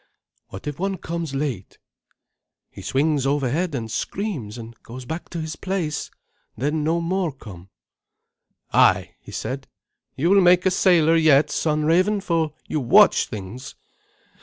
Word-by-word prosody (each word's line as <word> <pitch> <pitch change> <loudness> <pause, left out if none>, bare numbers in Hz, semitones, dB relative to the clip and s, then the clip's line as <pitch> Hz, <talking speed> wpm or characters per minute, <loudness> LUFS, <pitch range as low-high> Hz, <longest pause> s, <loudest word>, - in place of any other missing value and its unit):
"What 95 - -10
if 145 +1 -5
one 195 +1 -1
comes 165 -4 -5
late?" 135 -9 -4 0.9
"He - - -11
swings 140 0 0
overhead 145 +4 0
and 115 -3 -4
screams, 140 - -4
and 115 0 -9
goes 125 +2 -10
back 160 +7 -6
to 170 - -5
his 160 -1 -5
place; 175 -5 -3 0.5
then 150 +5 -1
no 165 +3 +1
more 180 0 -1
come." 95 -9 -12 1.0
"Ay," - - +4
he - - -13
said; - - -5 0.5
"you 170 +7 +1
will 200 0 +6
make 180 0 +5
a 190 - +4
sailor 170 -4 +4
yet, 155 -3 +4
son 150 -1 0
Raven, 185 +6 +3
for 165 -5 -1
you 155 - -1
watch 195 - +5
things. 110 +4 -8
155 Hz, 145 wpm, -23 LUFS, 135-175 Hz, 1.0 s, will